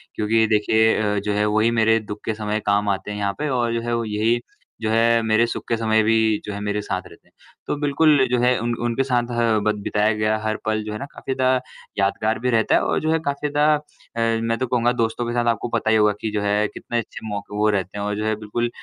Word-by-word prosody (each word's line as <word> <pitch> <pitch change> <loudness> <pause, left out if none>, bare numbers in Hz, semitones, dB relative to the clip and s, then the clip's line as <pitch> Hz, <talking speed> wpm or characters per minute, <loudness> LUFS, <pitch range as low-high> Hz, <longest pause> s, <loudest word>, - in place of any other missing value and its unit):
क्योंकि 110 +1 +2
देखिए 110 +1 +3
अ, 105 -1 0
जो 105 +1 -2
है 105 +1 +1
वो 105 0 +1
ही 115 +2 +3
मेरे 110 0 +4
दुख 105 -1 -8
के 110 - -1
समय 105 0 -2
काम 100 0 +2
आते 95 +1 -2
हैं 105 - -5
यहाँ 100 -1 -1
पे 150 - -1
और 120 -3 0
जो 115 - -1
है - - 0 0.2
यही 115 +3 +2 0.4
जो 110 - -1
है, 115 +1 +3
मेरे 110 +1 +3
सुख - - -5
के 115 - +2
समय 110 -1 +2
भी 115 +1 +3 0.3
जो 105 - -5
है 100 - -5
मेरे 105 0 -2
साथ 95 -2 -3
रहते - - -18
हैं। - - -29 0.4
तो - - -1
बिल्कुल 145 -1 +4
जो 125 - +2
है 125 +1 +3
उन 120 +1 -1
उनके 120 +3 0
साथ 125 -2 0
ह 115 -2 +2
बत 105 0 +2
बिताया 105 +2 +1
गया 105 0 +1
हर 110 0 -1
पल 110 0 0
जो 105 - -6
है - - -4
ना - - -5
काफ़ी 135 - -5
ज़्यादा 130 -1 +2 0.4
यादगार 110 +3 0
भी 125 +2 -1
रहता 115 -2 +3
है - - +3
और - - 0
जो 155 +1 0
है 160 - +2
काफ़ी 140 +1 -1
ज़्यादा 150 +1 +3 0.6
अ, - - -3
मैं 115 0 0
तो 130 - -2
कहूँगा 120 0 +2
दोस्तों 115 0 -1
के 120 - -2
साथ 120 -1 0
आपको 115 - -3
पता 110 - -1
ही 110 - +4
होगा 105 -1 +4
कि 110 - -2
जो 105 -1 -1
है 105 +1 +1
कितने 120 - -5
अच्छे 110 -1 -8
मौके 105 0 -5
वो 105 +1 +3
रहते 100 -1 -2
हैं 100 - -3
और 105 0 -2
जो 105 - -2
है 110 0 +1
बिल्कुल, 120 +3 -2
110 Hz, 270 wpm, -22 LUFS, 105-120 Hz, 0.6 s, मेरे